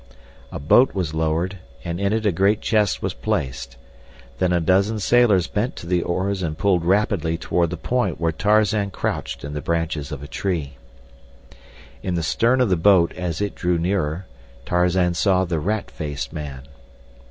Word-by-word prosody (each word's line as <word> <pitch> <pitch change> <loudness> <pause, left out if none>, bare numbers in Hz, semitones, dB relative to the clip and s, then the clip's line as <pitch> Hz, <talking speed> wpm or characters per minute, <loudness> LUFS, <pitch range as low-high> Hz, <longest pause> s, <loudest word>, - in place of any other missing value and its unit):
A - - -5
boat 120 - +4
was 90 -5 -2
lowered, 80 +4 -1 0.2
and 85 0 -4
in 100 0 +1
it 110 0 0
a 105 - +4
great 100 +5 +2
chest 105 -3 +1
was - - -1
placed. 60 -2 -3 0.6
Then 90 -1 +2
a 90 - +3
dozen 95 +6 +2
sailors 105 -4 +3
bent 110 +5 -2
to - - -9
the 90 0 +1
oars 95 +3 -1
and 80 -3 -3
pulled 90 -2 +2
rapidly 90 -3 +1
toward 85 0 0
the 85 - -5
point 120 -10 -1
where 85 0 +1
Tarzan 105 +3 +2
crouched 95 - -4
in 70 +1 -6
the 75 - -4
branches 80 -3 -2
of 70 -2 -6
a - - -7
tree. 80 -7 -3 1.3
In 90 -2 -2
the 85 - -1
stern 120 +10 +2
of 125 - +2
the 90 - +3
boat, 85 -1 +4
as 90 -1 -4
it 105 - -1
drew 90 -1 0
nearer, 85 -1 -1 0.4
Tarzan 90 0 +2
saw 95 +1 +2
the 85 -3 -1
rat 105 +6 -2
faced 75 -3 -5
man. 70 -3 -6
90 Hz, 175 wpm, -22 LUFS, 80-100 Hz, 1.3 s, boat